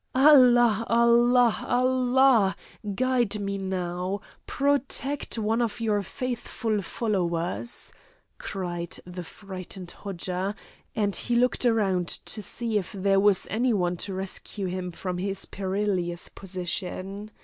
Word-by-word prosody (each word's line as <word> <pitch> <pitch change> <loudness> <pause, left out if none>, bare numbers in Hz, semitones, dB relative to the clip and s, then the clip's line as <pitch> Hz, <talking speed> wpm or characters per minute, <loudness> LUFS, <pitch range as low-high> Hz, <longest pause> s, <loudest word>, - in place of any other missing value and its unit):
"Allah! 245 -5 +6
Allah! 235 0 +4
Allah! 255 -4 +4 0.4
Guide 245 -3 +1
me 200 -1 -2
now. 185 0 -2 0.3
Protect 280 -1 0
one 225 +2 +1
of 230 -1 -1
your 215 -3 +1
faithful 230 -1 -3
followers," 180 0 -2 0.5
cried 175 -3 -4
the 180 0 -7
frightened 185 0 -8
Hodja, 190 0 -3 0.4
and 205 -3 +1
he 240 - +1
looked 250 +1 +2
around 195 -6 +2
to 215 - -4
see 220 +2 -1
if 185 - -7
there 195 0 +2
was 200 -1 +4
any 240 +3 +2
one 180 -3 +1
to 195 +2 -5
rescue 195 +1 -4
him 180 0 -3
from 180 +1 -4
his 195 +1 -2
perilous 190 -3 -2
position. 190 +2 -5
200 Hz, 115 wpm, -26 LUFS, 185-235 Hz, 0.5 s, Allah